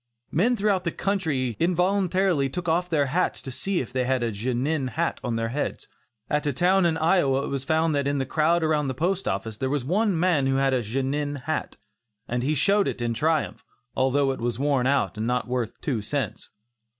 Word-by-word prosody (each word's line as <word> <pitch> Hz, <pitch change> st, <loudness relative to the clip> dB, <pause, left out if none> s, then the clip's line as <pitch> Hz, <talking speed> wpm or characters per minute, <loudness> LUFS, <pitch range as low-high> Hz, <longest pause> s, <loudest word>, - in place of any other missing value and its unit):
Men 230 Hz, +10 st, +2 dB
throughout 200 Hz, -3 st, +1 dB
the 170 Hz, -, -1 dB
country 155 Hz, -, -1 dB
involuntarily 180 Hz, -3 st, +2 dB
took 175 Hz, +6 st, -5 dB
off 175 Hz, +2 st, +1 dB
their 150 Hz, -4 st, +2 dB
hats 165 Hz, +7 st, 0 dB
to 135 Hz, -, -6 dB
see 175 Hz, +9 st, -1 dB
if 130 Hz, 0 st, -8 dB
they 130 Hz, -1 st, 0 dB
had 130 Hz, -1 st, +1 dB
a 115 Hz, -, 0 dB
"Genin" 130 Hz, +7 st, -1 dB
hat 125 Hz, -, -2 dB
on 120 Hz, -2 st, -1 dB
their 115 Hz, 0 st, -1 dB
heads. 145 Hz, +5 st, -3 dB, 0.4 s
At 150 Hz, 0 st, 0 dB
a 145 Hz, -, +1 dB
town 185 Hz, +1 st, +3 dB
in 160 Hz, -1 st, 0 dB
Iowa 150 Hz, -5 st, +2 dB
it -, -, -4 dB
was 135 Hz, -1 st, -3 dB
found 160 Hz, +2 st, +1 dB
that 140 Hz, -1 st, 0 dB
in 140 Hz, 0 st, 0 dB
the 135 Hz, -, -1 dB
crowd 160 Hz, +5 st, +2 dB
around 155 Hz, -2 st, +1 dB
the 130 Hz, -, -3 dB
Post 180 Hz, +7 st, -1 dB
Office, 105 Hz, +3 st, -3 dB
there 130 Hz, +3 st, -1 dB
was 140 Hz, -3 st, -1 dB
one 195 Hz, -, +1 dB
man 165 Hz, -6 st, +2 dB
who 135 Hz, -, +1 dB
had 135 Hz, 0 st, +2 dB
a 125 Hz, -, +2 dB
"Genin" 135 Hz, +5 st, -2 dB
hat, 155 Hz, +2 st, -3 dB, 0.5 s
and 125 Hz, 0 st, -1 dB
he 145 Hz, +5 st, 0 dB
showed 200 Hz, +7 st, +3 dB
it -, -, -3 dB
in 120 Hz, -1 st, -1 dB
triumph, 155 Hz, +5 st, 0 dB, 0.3 s
although 135 Hz, +1 st, +2 dB
it 130 Hz, -, -5 dB
was 120 Hz, -1 st, -1 dB
worn 135 Hz, -2 st, +1 dB
out 135 Hz, -4 st, +1 dB
and 110 Hz, -, -1 dB
not 125 Hz, 0 st, 0 dB
worth 120 Hz, -3 st, -3 dB
two 125 Hz, -7 st, -1 dB
cents. 110 Hz, -2 st, -3 dB
145 Hz, 215 wpm, -25 LUFS, 130-170 Hz, 0.5 s, town